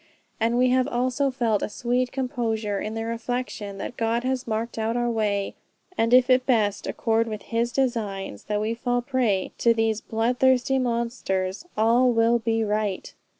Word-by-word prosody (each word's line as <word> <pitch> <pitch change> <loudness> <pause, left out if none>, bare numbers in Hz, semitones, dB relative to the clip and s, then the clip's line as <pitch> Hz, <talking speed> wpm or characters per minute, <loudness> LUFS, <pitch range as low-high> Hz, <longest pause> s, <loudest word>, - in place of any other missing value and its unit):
And 230 +2 +1
we 255 +1 +4
have 255 0 +3
also 255 +1 0
felt 235 -5 0
a - - -2
sweet 245 +3 -1
composure 225 -6 -2
in 215 +1 -4
the 225 0 -3
reflection 230 -3 -4
that 240 - -6
God 230 +1 0
has 260 -1 -2
marked 225 +1 -3
out 225 +2 0
our 240 0 0
way; 205 -3 -1 0.4
and 230 -5 +1
if 250 0 +6
it 255 0 +3
best 215 -5 +1
accord 225 0 0
with 215 -2 -5
his 235 +1 -1
designs 210 - -2
that 210 0 -1
we 215 +2 -1
fall 245 +1 -1
a - - +1
prey 240 -8 0
to 235 -1 +4
these 225 -1 0
blood 230 +3 -1
thirsty 260 0 +3
monsters, 235 - -2
all 235 +3 +4
will 230 +1 +3
be 225 0 0
right." 210 -2 -2
230 Hz, 180 wpm, -25 LUFS, 220-250 Hz, 0.4 s, if